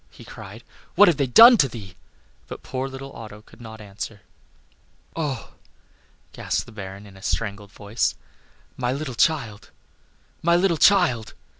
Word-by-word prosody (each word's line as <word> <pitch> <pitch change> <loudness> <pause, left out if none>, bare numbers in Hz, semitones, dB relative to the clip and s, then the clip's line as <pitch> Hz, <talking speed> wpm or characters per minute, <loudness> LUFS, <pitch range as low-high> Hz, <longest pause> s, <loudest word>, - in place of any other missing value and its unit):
he - - -15
cried; - - -11 0.3
"what 205 - +7
have 170 -5 +3
they 140 - 0
done 230 - +9
to 140 - +4
thee?" 105 -7 -10 0.5
But - - -9
poor 130 +1 -4
little 135 +1 -9
Otto 105 -1 -11
could 120 - -19
not 110 -1 -10
answer. 105 0 -8 0.9
"Oh!" 150 -5 -4 0.8
gasped - - -2
the - - -14
Baron, 100 -1 -9
in 100 -2 -15
a 95 - -15
strangled 100 -1 -3
voice, 105 +3 -2 0.6
"my 125 -1 -2
little 140 0 -4
child! 115 -6 0 0.7
my 170 +1 +3
little 175 -1 +2
child!" 160 - +3
120 Hz, 150 wpm, -23 LUFS, 105-150 Hz, 0.9 s, done